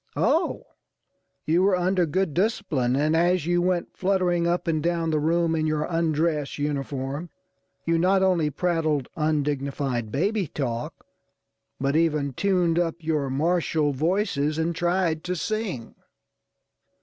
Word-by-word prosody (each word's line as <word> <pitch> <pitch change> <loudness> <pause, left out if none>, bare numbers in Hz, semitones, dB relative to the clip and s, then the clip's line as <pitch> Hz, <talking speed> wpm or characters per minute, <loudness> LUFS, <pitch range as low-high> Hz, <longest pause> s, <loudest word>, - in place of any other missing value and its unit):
Oh! - - +1 0.8
you 165 +3 +3
were 195 0 +4
under 180 -1 +1
good 185 0 0
discipline, 170 - 0
and 155 +3 +2
as 175 0 +2
you 175 +1 +2
went 180 -1 -1
fluttering 180 -3 +1
up 175 +1 -1
and 160 -2 +1
down 165 0 0
the 155 - +1
room 165 +2 +1
in 155 -1 0
your 155 -1 0
undress 160 -3 0
uniform, 140 +1 -3 0.6
you 165 0 +2
not 190 +2 +3
only 175 -5 +2
prattled 155 -3 0
undignified 140 - -1
baby 195 - 0
talk, 120 -5 -4 0.7
but 135 +2 0
even 150 -4 +1
tuned 175 0 +1
up 170 -2 0
your 155 -4 -1
martial 155 +1 +1
voices 155 -1 0
and 165 +1 -1
tried 175 -2 0
to 180 0 -1
sing! 190 - -3
165 Hz, 135 wpm, -25 LUFS, 145-175 Hz, 0.8 s, were